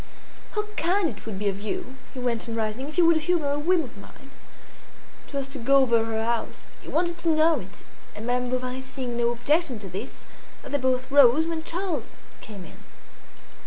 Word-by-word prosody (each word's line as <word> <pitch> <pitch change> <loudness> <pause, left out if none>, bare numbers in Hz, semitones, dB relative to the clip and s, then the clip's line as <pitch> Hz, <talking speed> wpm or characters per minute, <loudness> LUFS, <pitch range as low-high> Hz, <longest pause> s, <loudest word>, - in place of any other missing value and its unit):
"How 420 - +1
kind 360 +1 +2
it 210 - -14
would 210 -3 -4
be 205 +1 -1
of 200 0 -1
you," 305 - -4 0.2
he - - -5
went 240 -2 -1
on, 225 - -3
rising, 225 +5 -2
"if 310 - -9
you 350 - +6
would 335 -1 +6
humour 315 -2 +1
a 290 - 0
whim 340 +2 +3
of 245 - -10
mine." 270 +7 -14 1.0
It - - -16
was 275 -1 -1
to 275 0 -7
go 270 +4 +3
over 235 -3 +3
her 225 0 -1
house; 235 0 -3
he - - -10
wanted 340 +1 0
to 335 - 0
know 315 0 +4
it; 190 +1 -12 0.3
and 215 - -6
Madame 250 0 0
Bovary 255 +1 -2
seeing 260 -2 -5
no 235 0 +2
objection 265 +4 +1
to 200 -2 -8
this, 195 +8 -7 0.4
they 285 - -1
both 260 0 0
rose, 285 +2 +7
when 330 -1 -2
Charles 350 +1 -3 0.3
came 200 -5 -9
in. - - -14
260 Hz, 200 wpm, -26 LUFS, 230-320 Hz, 1.0 s, rose